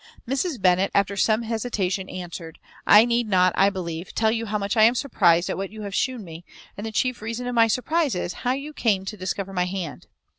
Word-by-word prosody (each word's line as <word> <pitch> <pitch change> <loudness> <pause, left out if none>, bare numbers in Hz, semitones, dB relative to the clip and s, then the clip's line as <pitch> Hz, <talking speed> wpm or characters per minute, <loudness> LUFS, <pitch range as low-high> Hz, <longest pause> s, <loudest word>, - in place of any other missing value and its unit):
Mrs. 270 +2 -1
Bennet, 185 +1 +3
after 200 0 +2
some 215 +3 +2
hesitation, 210 -5 -2
answered, 170 -2 -7 0.3
"I 210 +2 +8
need 235 -2 0
not, 185 -2 +4
I 195 +1 +4
believe, 175 -3 -6
tell 220 -1 +2
you 230 0 -2
how 210 +1 -1
much 200 +1 -2
I 220 - +4
am 230 +3 +6
surprized 175 -9 +2
at - - -3
what 195 0 -4
you 215 -1 -8
have 200 -1 -6
shewn 250 +1 -1
me; 165 -1 -10 0.3
and 210 +2 -6
the - - -5
chief 250 +2 -1
reason 230 +3 -4
of 245 - -3
my 230 -1 +5
surprize 290 - 0
is, 180 0 -3
how 250 - +1
you 280 +3 -6
came 200 -8 0
to 205 - -5
discover 195 0 -4
my 180 -1 +1
hand. 180 -8 -6
205 Hz, 225 wpm, -24 LUFS, 185-235 Hz, 0.3 s, I